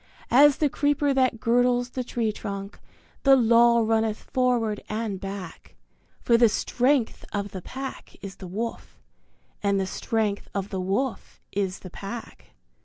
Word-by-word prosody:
As 280 +2 +7
the 300 - +2
creeper 290 0 +1
that 255 -3 +2
girdles 245 +1 +2
the 255 - -3
tree 235 -2 -1
trunk 200 -1 -6 0.4
the 275 -1 +6
Law 235 -1 +5
runneth 220 -1 +1
forward 240 -5 0
and 215 -3 -3
back 195 -3 -8 0.5
For 235 - +4
the 235 -1 +6
strength 250 +3 0
of 200 -1 -3
the 190 - -6
Pack 265 +7 -7
is 195 -1 -9
the 185 - -9
Wolf, 220 +6 -5 0.6
and 200 -1 +1
the 190 - 0
strength 210 +1 -2
of 200 0 -2
the 190 -2 -3
Wolf 205 +8 -2
is 195 -2 -2
the 185 - -10
Pack. 215 +6 -9
225 Hz, 150 wpm, -25 LUFS, 200-250 Hz, 0.6 s, As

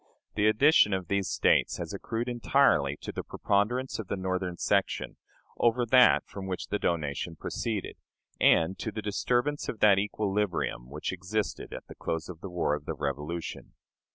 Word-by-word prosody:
The 105 0 +2
addition 110 -2 +5
of 95 -3 -5
these 100 -2 0
States - - +2
has - - -5
accrued 115 +2 -3
entirely 120 - +2
to - - -5
the - - -4
preponderance 120 +7 0
of 110 - -5
the 100 - -2
Northern 95 -1 -2
section - - 0 0.4
over 120 +1 +3
that 125 +2 +5
from 95 -1 -8
which 95 -1 -4
the 105 - -1
donation 80 0 -2
proceeded, 110 +4 -4 0.4
and 85 +4 +4
to 110 - -3
the 110 +1 -5
disturbance 125 +7 0
of 110 - -5
that 100 -2 +6
equilibrium 100 - -1
which 75 +6 -4
existed 95 +4 -3
at - - -7
the - - -11
close 80 +1 -4
of 85 -2 -9
the 95 - -6
war 90 -4 0
of 75 -1 -4
the - - -3
Revolution. 75 +4 -4
100 Hz, 170 wpm, -29 LUFS, 85-110 Hz, 0.4 s, that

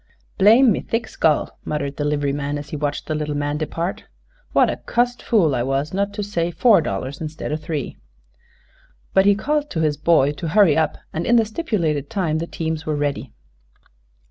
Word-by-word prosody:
"Blame 225 +4 +6
my - - -2
thick 230 +1 -3
skull!" 155 -2 0
muttered 140 -2 -3
the 145 - -1
livery 145 -1 0
man, 145 0 -2
as 145 0 -8
he - - -5
watched 145 -1 -3
the 155 - -2
little 150 -1 -2
man 145 0 -1
depart. 165 +3 -3 0.5
"What - - +4
a - - -2
cussed 245 0 -1
fool 175 - +2
I 120 - 0
were 135 +3 0
not 200 +1 0
to 210 - -2
say 175 -4 -1
four 210 +2 +4
dollars 130 +4 -4
instead 155 -1 -5
o' - - 0
three!" 155 -2 -4 1.2
But 190 +1 +4
he 205 - +6
called 295 +7 -1
to 160 - -2
his 150 -2 +1
boy 150 -3 +3
to 155 +3 -5
hurry 170 -2 +4
up, 160 -1 +1 0.2
and 160 - -3
in 240 - +4
the 225 -2 +4
stipulated 180 - -2
time 160 -5 -1
the 165 - -4
teams 160 -1 -3
were 155 -1 -2
ready. 145 -4 -2
155 Hz, 195 wpm, -21 LUFS, 145-200 Hz, 1.2 s, Blame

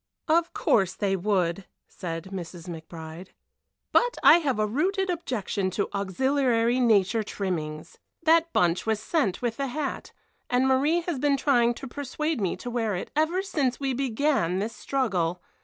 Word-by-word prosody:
"Of 335 +1 +2
course 190 -3 +2
they 195 -1 0
would," 185 -2 0 0.2
said 165 +1 -6
Mrs. 175 -1 -7
McBride; 160 +1 -8 0.6
"but 485 +1 +3
I 345 - +8
have 275 -8 -1
a 215 - +2
rooted 370 - 0
objection 220 - -2
to 200 - 0
auxiliary 240 +4 +1
nature 225 -2 +3
trimmings. 165 -7 -4 0.2
That 330 +1 +4
bunch 175 - +1
was 220 -1 +1
sent 215 - -1
with 230 -2 -1
the 275 - -1
hat, 275 +2 -4 0.4
and 250 +1 +2
Marie 285 +6 +3
has 335 -5 -3
been 280 0 +2
trying 240 -4 +3
to 270 - -8
persuade 285 +1 -3
me 190 - 0
to 245 - -7
wear 225 -4 -1
it 180 - -5
ever 325 +5 +1
since 285 -10 -1
we 270 -2 -1
began 255 - 0
this 215 +4 -3
struggle. 180 -11 -1
235 Hz, 155 wpm, -26 LUFS, 190-285 Hz, 0.6 s, I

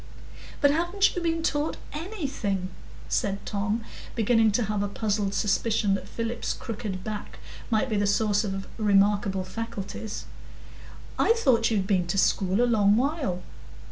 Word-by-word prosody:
"But 285 - +6
haven't 345 +6 +2
you 360 - -2
been 330 -1 0
taught 295 0 0 0.2
_any_thing?" 280 - -3 0.4
said 200 0 -1
Tom, 210 +2 -1 0.3
beginning 225 -1 +4
to 240 - +2
have 210 -1 -1
a 205 - 0
puzzled 200 -1 -1
suspicion 210 0 +1
that 195 0 -3
Philip's 230 +1 -2
crooked 210 -5 -5
back 215 -1 -6 0.3
might 220 +2 +2
be 220 -4 -1
the 205 0 +2
source 205 +1 +2
of 195 -2 -3
remarkable 200 -2 +3
faculties. 205 +1 -5 0.9
"I 455 - +5
thought 255 - +3
you'd 205 -4 +1
been 185 -3 +1
to 175 - -1
school 195 +3 +3
a - - +5
long 210 -4 +4
while." 260 - -1
215 Hz, 145 wpm, -27 LUFS, 200-240 Hz, 0.9 s, But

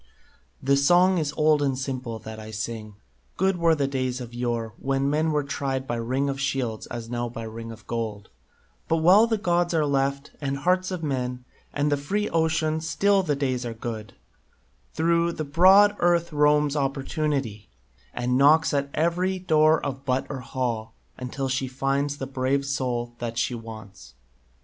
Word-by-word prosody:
"The 140 +1 +3
song 175 +6 +4
is 150 -2 -1
old 155 -1 +4
and 135 -2 0
simple 130 -3 -4
that 110 0 -9
I 110 0 -9
sing: 110 -1 -5 0.4
Good 190 0 +2
were 165 -1 +3
the 145 -2 0
days 130 -2 -2
of 120 -1 -8
yore, 120 -2 -2
when 135 0 0
men 155 +2 +1
were 150 -1 +1
tried 135 -1 -3
By 120 - -2
ring 130 +4 -1
of 135 -1 -3
shields, 125 -5 -2
as 115 -1 -6
now 120 0 -3
by 115 -1 -7
ring 115 +1 -7
of 110 -2 -12
gold; 110 -3 -4 0.6
But, 165 - +2
while 185 +8 +6
the 225 -1 +1
gods 175 -3 +1
are 155 -2 +2
left, 140 0 -1
and 140 -1 -2
hearts 185 +5 +1
of 180 -3 -4
men, 125 -3 -3 0.3
And 145 +1 0
the 145 - +2
free 205 +9 -1
ocean, 160 -1 +1
still 195 +5 +2
the 150 -6 0
days 130 -3 -1
are 115 -1 -5
good; 110 -3 -6 0.8
Through 170 +1 +2
the 155 - -4
broad 190 +7 +6
Earth 170 -1 +2
roams 150 0 +3
Opportunity 135 -5 -2 0.4
And 125 +1 0
knocks 155 +3 +5
at 140 -1 0
every 175 +4 +1
door 155 -3 +3
of 135 -1 -4
hut 130 +1 +1
or 135 - -4
hall, 120 -4 -3 0.2
Until 135 +2 -3
she 130 0 -1
finds 135 +2 -1
the 135 - -4
brave 135 +1 -1
soul 125 -4 -2
that 115 -1 -4
she 120 +1 0
wants." 110 - -10
140 Hz, 175 wpm, -25 LUFS, 120-160 Hz, 0.8 s, while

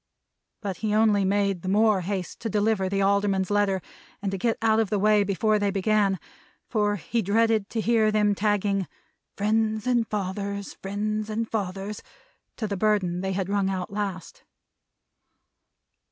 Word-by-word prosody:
But 195 -3 -3
he 215 -1 -1
only 215 -2 +4
made 195 -1 +1
the 185 - -4
more 210 -1 +3
haste 185 -1 -4
to 225 - -3
deliver 205 -2 +1
the 195 0 0
Alderman's 200 -1 +1
letter 200 -3 +1 0.4
and 195 -2 -3
get 230 +3 +1
out 220 0 +3
of 220 -3 +1
the 210 - +1
way 210 +1 +4
before 210 +2 +1
they 205 0 +1
began; 200 0 +2 0.5
for 210 -2 +1
he 225 +5 -2
dreaded 220 +1 +2
to 225 - -2
hear 225 -1 +3
them 210 -1 +3
tagging 200 -2 0 0.5
"Friends 215 +1 +1
and 240 -3 +2
Fathers, 200 0 -3
Friends 210 +2 -3
and 225 +1 -2
Fathers," 200 -1 -4 0.6
to 225 - -2
the 200 -1 -2
burden 185 -4 +1
they 190 0 -2
had 190 -1 -2
rung 200 -1 +1
out 190 0 -4
last. 195 -4 -5
205 Hz, 155 wpm, -26 LUFS, 195-215 Hz, 0.6 s, only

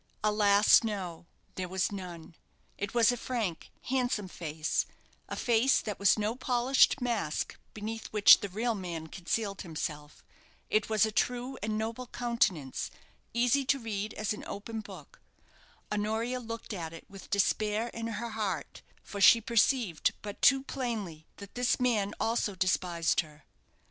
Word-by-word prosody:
Alas, 210 +1 +5
no, 185 -6 -4 0.3
there 185 -1 -4
was 190 +1 0
none. 175 -4 -8 0.4
It 205 +3 -5
was 235 -1 +5
a 245 - -2
frank, 220 -9 -3
handsome 245 -6 0
face 155 -3 -2 0.4
a - - -3
face 240 +2 +3
that 210 -2 -5
was 200 +1 +4
no 215 +2 -1
polished 255 +2 +3
mask 230 -11 -2 0.2
beneath 220 +1 -5
which 210 -2 +7
the 205 - -5
real 225 +5 -1
man 175 -5 -5
concealed 195 +4 -3
himself. 150 -3 -6 0.5
It 215 0 +2
was 220 -1 +4
a 220 - -2
true 250 +4 -1
and 215 +1 -1
noble 225 +3 -3
countenance, 215 - -1 0.4
easy 245 +4 +2
to 275 - +2
read 215 -4 -4
as 215 0 -1
an 210 - -8
open 220 +2 -5
book. - - -11 0.7
Honoria 220 +4 -1
looked 230 -1 -6
at 165 -4 -5
it 165 - -11
with 195 -1 -12
despair 210 +3 +1
in 230 0 -5
her 230 +1 -4
heart, 195 -9 -3 0.2
for 200 - -6
she 230 - +8
perceived 230 - +2
but 205 -1 -7
too 270 0 +5
plainly 215 - -4
that 200 -1 -11
this 245 0 +1
man 215 -5 +1
also 225 -3 0
despised 180 -2 +1
her. 150 -3 -5
215 Hz, 150 wpm, -30 LUFS, 185-235 Hz, 0.7 s, she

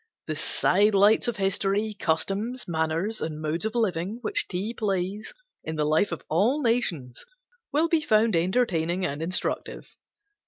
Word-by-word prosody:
The 155 - -3
side 200 +7 +2
lights 205 +4 +5
of 240 - -1
history, 200 +1 0
customs, 200 +7 -1
manners, 165 +6 -1
and 155 -1 -4
modes 155 +5 -2
of 220 +2 -3
living 200 -2 -1
which 410 -1 -1
tea 200 +5 -3
plays 200 -1 -2 0.3
in 160 - -4
the 150 -1 0
life 155 +6 +2
of 170 - -5
all 235 - +1
nations 175 - -1 0.5
will 310 +3 +2
be 330 -1 +2
found 220 - +3
entertaining 180 -1 +1
and 145 +2 -3
instructive. 180 +4 -2
195 Hz, 150 wpm, -26 LUFS, 165-220 Hz, 0.5 s, lights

